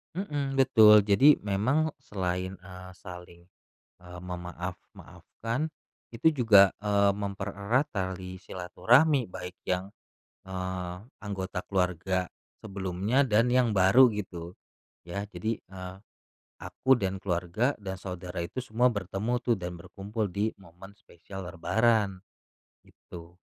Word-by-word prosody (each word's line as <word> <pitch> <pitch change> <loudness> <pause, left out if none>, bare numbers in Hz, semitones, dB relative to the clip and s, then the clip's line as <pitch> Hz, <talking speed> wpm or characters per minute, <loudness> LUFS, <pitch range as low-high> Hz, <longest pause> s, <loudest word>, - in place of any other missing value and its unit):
Mhm, 145 -7 -2
betul, 110 -6 +7
jadi 125 +9 +6
memang 125 +11 +1
selain, 95 -1 -3
eee, 95 -1 -10
saling, 90 -2 -11 0.6
eee, 90 0 -10
memaaf-maafkan 90 - -6 0.4
itu 125 +8 +2
juga, 100 -4 +7
eee, 100 -1 +3
mempererat 100 +5 -1
tali 95 -1 -4
silaturahmi 120 - +2
baik 90 0 -7
yang, 90 +1 -1 0.6
eee, 90 -1 -4 0.3
anggota 95 -2 -4
keluarga 90 -1 0 0.3
sebelumnya 100 +4 -1
dan 120 -1 +3
yang 125 -2 +4
baru 105 +6 +6
gitu, 95 -5 -6 0.5
ya. 100 +4 -5
Jadi, 110 +2 -3
eee, 95 -1 -9 0.7
aku 130 0 +2
dan 95 -5 -2
keluarga 95 +8 -1
dan 95 -1 -5
saudara 90 -1 -7
itu 85 +9 -4
semua 125 0 +1
bertemu 105 +2 -1
tuh 120 -4 +1
dan 90 -1 -5
berkumpul 100 +4 -5
di 105 +4 -1
momen 95 +1 -15
spesial 95 +1 -11
lebaran, 95 +3 +1 0.6
gitu. 85 +1 -13
95 Hz, 110 wpm, -28 LUFS, 90-115 Hz, 0.7 s, betul